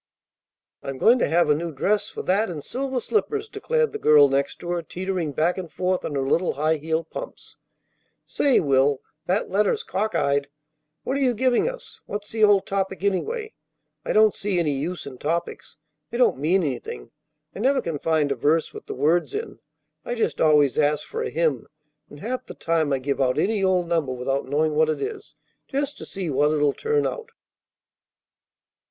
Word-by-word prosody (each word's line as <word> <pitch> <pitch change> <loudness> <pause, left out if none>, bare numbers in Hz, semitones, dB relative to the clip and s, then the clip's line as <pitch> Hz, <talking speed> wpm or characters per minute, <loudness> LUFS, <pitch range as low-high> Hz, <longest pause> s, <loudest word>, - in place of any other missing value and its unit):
"I'm 135 -1 -5
going 235 - +5
to - - +2
have 170 +1 +3
a 150 - +5
new 165 +3 -3
dress 205 +8 0
for - - -6
that 200 +4 +1
and 155 -5 -6
silver 265 0 -2
slippers," 430 - -1
declared 465 +2 0
the 430 - -5
girl 145 - +6
next 140 +4 -1
her, 175 0 -2
teetering 180 -1 -3
back 165 +6 0
and 170 -4 -7
forth 185 0 -1
on 145 - -4
her 135 -1 -1
little 170 +5 +1
high 155 +3 +1
heeled 160 +2 -2
pumps. - - -8 0.7
"Say, 275 -3 +3
Will, 140 -1 +2 0.3
that 190 +4 0
letter's 205 +1 +1
cock 210 0 -2
eyed. 140 -2 +1 0.6
What 270 - -1
are - - -1
you 250 -3 +2
giving 255 - +2
us? - - -10
What's 205 0 -5
the 220 -1 0
old 205 -2 +5
topic, 190 -2 -2
anyway? 435 - -1 0.5
I - - -2
don't 215 -1 +5
see 200 -2 -2
any 165 -4 +1
use 155 +5 -3
in 130 -3 -9
topics. 165 +3 -3 0.3
They 235 - -4
don't 245 - +3
mean 175 +6 +2
anything. 130 -6 -5 0.4
I - - -6
never 265 +4 +3
can 165 - -3
find 155 -2 +1
a - - +1
verse 155 +6 +1
with - - -10
the - - -5
words 165 - +1
in. 430 -1 -5 0.4
I 240 - -3
just 230 - -1
always 150 -4 +4
ask 150 0 +1
for - - -4
a - - -2
hymn, 155 -7 0 0.4
and 145 - -13
half 255 +3 -4
the - - -9
time 165 -3 0
I 135 - +2
give 135 +1 -2
out 130 -1 +2
any 210 -1 +1
old 185 -2 +2
number 160 -6 0
without 130 +2 -2
knowing 155 +3 +1
what 155 +1 +3
it 155 - -1
is, 425 0 -6 0.3
just 285 +1 -2
to - - -7
see 185 -5 -4
what 145 +2 +3
it'll 150 -2 +2
turn 445 -1 0
out." 465 -1 -4
170 Hz, 195 wpm, -24 LUFS, 145-220 Hz, 0.7 s, girl